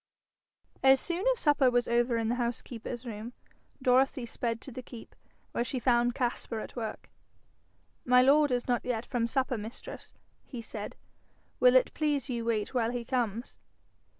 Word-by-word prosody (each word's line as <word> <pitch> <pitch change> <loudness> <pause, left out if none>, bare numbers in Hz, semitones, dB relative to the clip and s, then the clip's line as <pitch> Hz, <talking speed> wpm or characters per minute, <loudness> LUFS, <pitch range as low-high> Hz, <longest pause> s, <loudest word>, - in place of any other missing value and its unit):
As 265 0 +6
soon 350 +5 -3
as - - 0
supper 290 - +4
was 245 0 +1
over 235 0 +2
in 225 -1 0
the 235 - +1
housekeeper's 240 +1 -4
room, 225 +1 -6 0.5
Dorothy 255 0 +3
sped 230 0 -3
to 270 - -9
the 255 - -6
keep, 235 -2 -12 0.4
where - - 0
she 245 +2 -3
found 240 -1 +2
Caspar 240 -2 -2
at - - -8
work. 225 -3 -5 0.9
'My 250 0 +5
lord 290 +2 +5
is 245 -1 -1
not 245 -2 +1
yet 245 -2 -2
from 240 -3 -1
supper, 255 -1 0
mistress,' 220 +3 -9 0.3
he 250 - -7
said. 220 -2 -7 0.6
'Will 250 0 +6
it 255 - +4
please 290 -3 0
you 235 -1 -2
wait 220 -1 -1
while 235 -3 +1
he 240 -1 -4
comes?' 235 -2 -2
245 Hz, 165 wpm, -30 LUFS, 230-260 Hz, 0.9 s, As